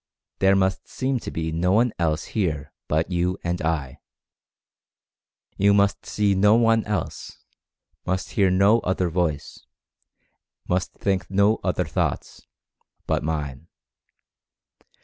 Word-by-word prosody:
There 95 0 +4
must 95 0 0
seem 130 -1 -2
to - - -6
be 80 0 -3
no 90 +3 +1
one 115 +2 +3
else 80 -1 0
here 80 -10 -2
but 80 +4 0
you 90 +1 0
and 85 0 -2
I. 75 -5 -2 1.6
You 100 +1 +4
must 100 0 +1
see 105 -1 +1
no 105 +3 +4
one 115 -1 +3
else; 105 -5 -5 0.6
must 95 +1 -2
hear 100 -3 +3
no 100 +5 +4
other 95 -3 -1
voice; 80 -4 -2 1.0
must 90 +1 -1
think 95 -2 -2
no 100 +3 +3
other - - 0
thoughts, - - -3 0.6
but - - 0
Mine. 75 -1 -4
95 Hz, 125 wpm, -24 LUFS, 80-100 Hz, 1.6 s, There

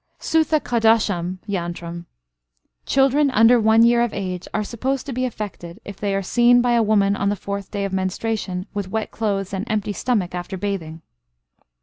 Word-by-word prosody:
Suthakadosham 225 - +1
yantram. 170 -2 -4 0.8
Children 275 +2 +3
under 235 0 +5
one 220 +1 +5
year 235 0 +4
of 240 -2 -1
age 185 -2 -4
are 215 - -1
supposed 255 +5 -3
to 275 - -5
be 255 +1 -1
affected, 205 -6 -6
if 200 -1 -8
they 200 -1 -1
are 195 - -1
seen 240 +5 +4
by 245 0 +2
a 235 -1 +4
woman 205 -2 +2
on 200 0 0
the 205 - 0
fourth 200 0 -5
day 200 -1 -3
of 195 - -4
menstruation 190 0 -2
with 200 -2 -4
wet 220 +1 -3
clothes 200 -3 -2
and 190 0 -2
empty 210 -1 -1
stomach 200 -3 -1
after 180 +2 -5
bathing. 175 -5 -4
205 Hz, 175 wpm, -21 LUFS, 190-235 Hz, 0.8 s, under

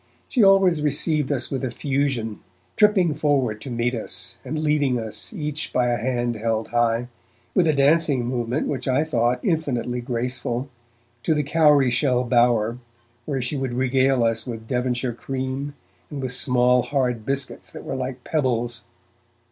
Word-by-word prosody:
She 250 - +1
always 195 -5 +5
received 150 0 +1
us 130 -4 0
with 135 -1 -2
effusion, 130 - -1 0.4
tripping 195 -6 +4
forward 135 -8 0
to 135 - -6
meet 120 0 -1
us, 115 0 -3
and 155 - -4
leading 150 -4 +1
us, 110 -2 -5
each 150 -6 -3
by 125 -1 +1
a 120 - +1
hand 120 -1 -1
held 110 0 -1
high, 120 0 +1 0.5
with 175 -3 +3
a 155 - +4
dancing 140 -2 +3
movement 125 +2 -1
which 130 -2 -3
I 130 +3 +2
thought 125 -5 +1
infinitely 125 -7 -1
graceful, 125 +1 -3 0.5
to 160 - +1
the 150 - +1
cowry 145 -3 +4
shell 125 0 +2
bower, 120 -1 +2 0.5
where 135 -4 -1
she 125 +5 -2
would 130 -3 -2
regale 130 0 +2
us 115 +2 0
with 115 -2 -6
Devonshire 125 0 -1
cream 135 +3 -4 0.3
and 145 - -6
with 130 -2 -3
small 125 -1 +4
hard 125 -4 -1
biscuits 130 -8 -3
that - - -9
were - - -4
like 130 -1 -5
pebbles. 120 -6 -1
130 Hz, 155 wpm, -23 LUFS, 120-145 Hz, 0.5 s, always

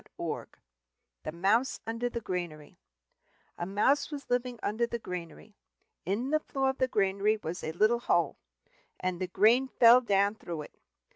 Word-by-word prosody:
"[Pg - - -27
22] - - -5 0.6
THE - - -3
MOUSE 200 +10 +1
UNDER 230 +2 -2
THE 235 -1 -5
GRANARY 175 -7 -5 0.8
A 175 - -4
Mouse 210 +9 +2
was 290 -4 -8
living 245 0 0
under 230 +3 0
the 235 - -3
granary. 180 0 -8 0.5
In 230 +8 -1
the 310 - +3
floor 270 -3 -1
of 265 - -14
the 260 - +3
granary 200 -1 +1
there 210 - -9
was 170 +2 -4
a 160 - -2
little 215 +7 +3
hole, 170 -7 +1 0.6
and 185 -1 -2
the 185 - -1
grain 230 +8 +4
fell 245 0 +6
down 200 -3 +2
through 170 -7 -6
it. - - -15
215 Hz, 170 wpm, -30 LUFS, 180-245 Hz, 0.8 s, fell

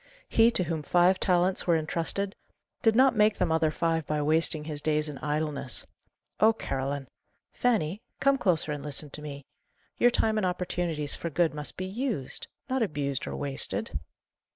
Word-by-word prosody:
He 225 0 +5
to 185 - +1
whom 165 -2 -2
five 175 +5 +3
talents 180 0 +2
were 170 - +5
intrusted, 165 +5 -1 0.5
did 225 -1 +4
not 260 +1 +5
make 210 0 +4
them 165 - +1
other 160 -1 +3
five 165 0 0
by 150 0 0
wasting 155 +1 +2
his 150 -1 -5
days 155 0 +1
in 145 -3 -7
idleness. 150 -3 -1 0.5
Oh, 220 +1 +6
Caroline! 135 - -3 0.5
Fanny, 210 -6 +1 0.2
come 275 0 +3
closer 165 -7 +2
and 145 -2 -4
listen 145 0 -3
to 150 - -6
me 140 -2 -7 0.5
your 245 - +6
time 220 -2 +1
and 210 - +1
opportunities 175 -4 -1
for 170 - -4
good 165 +1 +1
must 150 -1 -2
be 185 - -3
used 210 - -3 0.2
not 260 -1 0
abused 145 - -1
or - - -4
wasted." 140 -1 -3
165 Hz, 170 wpm, -28 LUFS, 150-195 Hz, 0.5 s, Oh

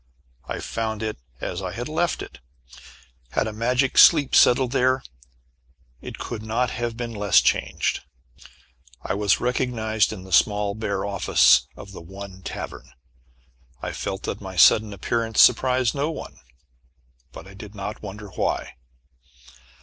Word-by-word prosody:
I - - -5
found 110 -1 -3
it 110 - -4 0.2
as 90 - -4
I 95 -2 -5
had 120 +4 -5
left 165 +3 -1
it. - - -12 0.9
Had - - +1
a 110 - -4
magic 125 +4 +1
sleep 150 -5 +6
settled 125 0 +5
there 130 0 +2 1.0
it - - -8
could 115 -3 -6
not 115 +3 -1
have 120 -1 -4
been 120 -1 -5
less 105 -2 +4
changed. - - 0 1.0
I - - -2
was 100 -1 +2
recognized 115 -3 0
in 100 -4 -8
the 95 - -13
small 105 +3 +3
bare 100 -2 -3
office 100 -1 +4
of 100 - -11
the 95 - -10
one 95 +2 -10
tavern. - - -7 0.9
I - - -5
felt 95 +1 -5
that - - -4
my 95 -1 -8
sudden 105 +5 +5
appearance 115 +3 -2
surprised 130 -2 +4
no 145 +2 -1
one. 165 - -8 0.9
But - - -11
I 95 - -13
did 105 +1 -11
not 105 +1 -6
wonder 105 +1 -8
why. 90 - -2
110 Hz, 145 wpm, -23 LUFS, 100-125 Hz, 1.0 s, sleep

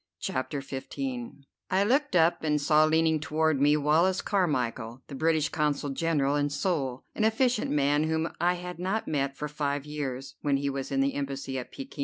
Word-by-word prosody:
CHAPTER 135 +2 -3
XV 135 -1 -6 0.8
I 190 +2 +3
looked 270 +2 +1
up, 165 -1 +3
and 150 -1 +2
saw 155 +1 +4
leaning 160 0 +3
toward 155 -1 +1
me 145 +1 +5
Wallace 160 +6 +2
Carmichel, 130 - -1
the - - -11
British 155 +1 +1
Consul 150 -2 -1
General 145 -2 +1
in 145 0 +1
Seoul, 140 -4 -1
an 220 - -1
efficient 225 +1 +2
man 145 +1 +2
whom 160 +1 -1
I 175 +1 +3
had 180 -1 -7
not 190 +5 -1
met 140 -2 -1
for 150 - -3
five 145 -1 -2
years, 140 -3 -5
when 140 -2 +2
he 140 0 -1
was 135 0 -4
in 135 0 +2
the 140 +1 +1
Embassy 135 -1 -3
at 125 - -8
Pekin. 275 -1 -9
150 Hz, 185 wpm, -28 LUFS, 140-165 Hz, 0.8 s, me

